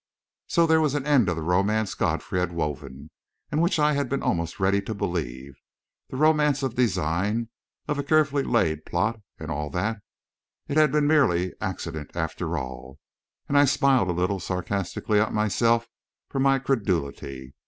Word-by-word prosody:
So 170 Hz, -, +3 dB
there 160 Hz, -1 st, +4 dB
was 150 Hz, -2 st, +1 dB
an 140 Hz, -2 st, -2 dB
end 135 Hz, -10 st, +4 dB
of 85 Hz, -, 0 dB
the 80 Hz, -, -4 dB
romance 100 Hz, +5 st, +1 dB
Godfrey 90 Hz, -, -1 dB
had 90 Hz, -1 st, -1 dB
woven, 75 Hz, -4 st, -5 dB, 0.4 s
and 150 Hz, +2 st, +1 dB
which 170 Hz, 0 st, +2 dB
I 150 Hz, 0 st, +3 dB
had 140 Hz, -3 st, -1 dB
been 140 Hz, +1 st, -2 dB
almost 85 Hz, -1 st, -1 dB
ready 100 Hz, +1 st, +2 dB
to 110 Hz, +2 st, -5 dB
believe 70 Hz, -9 st, -4 dB, 0.5 s
the -, -, -6 dB
romance 150 Hz, -2 st, +3 dB
of 130 Hz, -3 st, -1 dB
design, 105 Hz, 0 st, 0 dB, 0.4 s
of 145 Hz, -1 st, -1 dB
a -, -, -1 dB
carefully 145 Hz, -1 st, +2 dB
laid 80 Hz, -, +1 dB
plot, 110 Hz, +8 st, -1 dB, 0.2 s
and -, -, -6 dB
all 75 Hz, +1 st, -3 dB
that. 105 Hz, +6 st, -2 dB, 0.7 s
It 140 Hz, -, -3 dB
had 155 Hz, -3 st, +5 dB
been 150 Hz, -1 st, +2 dB
merely 95 Hz, -, +3 dB
accident, 85 Hz, -6 st, -5 dB
after 80 Hz, 0 st, -2 dB
all. 65 Hz, 0 st, -7 dB, 0.5 s
And 145 Hz, -, -1 dB
I 145 Hz, 0 st, +7 dB
smiled 135 Hz, -7 st, +3 dB
a 90 Hz, 0 st, -1 dB
little 95 Hz, +2 st, 0 dB
sarcastically 95 Hz, +3 st, -1 dB
at 110 Hz, -, 0 dB
myself 115 Hz, +3 st, +2 dB, 0.4 s
for 135 Hz, -, -3 dB
my 135 Hz, 0 st, +4 dB
credulity. 75 Hz, -, -2 dB
105 Hz, 170 wpm, -25 LUFS, 85-140 Hz, 0.7 s, I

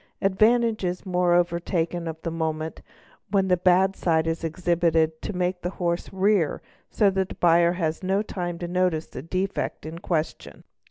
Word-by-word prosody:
Advantage 220 Hz, +3 st, +2 dB
is 180 Hz, +1 st, -3 dB
moreover 175 Hz, -1 st, +2 dB
taken 170 Hz, -1 st, -2 dB
of 160 Hz, -1 st, -5 dB
the 165 Hz, -, -2 dB
moment 160 Hz, -1 st, -3 dB, 0.5 s
when 195 Hz, -1 st, +1 dB
the 180 Hz, -, +5 dB
bad 185 Hz, +2 st, +3 dB
side 160 Hz, -2 st, +1 dB
is 165 Hz, 0 st, -2 dB
exhibited 165 Hz, -1 st, +1 dB
to -, -, -4 dB
make 180 Hz, -1 st, -2 dB
the 175 Hz, -, -2 dB
horse 170 Hz, -1 st, -2 dB
rear 190 Hz, -4 st, +1 dB, 0.3 s
so 205 Hz, -3 st, +3 dB
that 190 Hz, -1 st, -1 dB
the -, -, -7 dB
buyer 170 Hz, 0 st, +4 dB
has 165 Hz, -3 st, -2 dB
no. 195 Hz, +2 st, 0 dB
time 175 Hz, -4 st, -4 dB
to 175 Hz, -, -5 dB
notice 180 Hz, -3 st, 0 dB
the 125 Hz, -, -8 dB
defect 185 Hz, +4 st, -3 dB
in 160 Hz, +2 st, -7 dB
question. 165 Hz, -3 st, -3 dB
175 Hz, 170 wpm, -25 LUFS, 165-190 Hz, 0.5 s, the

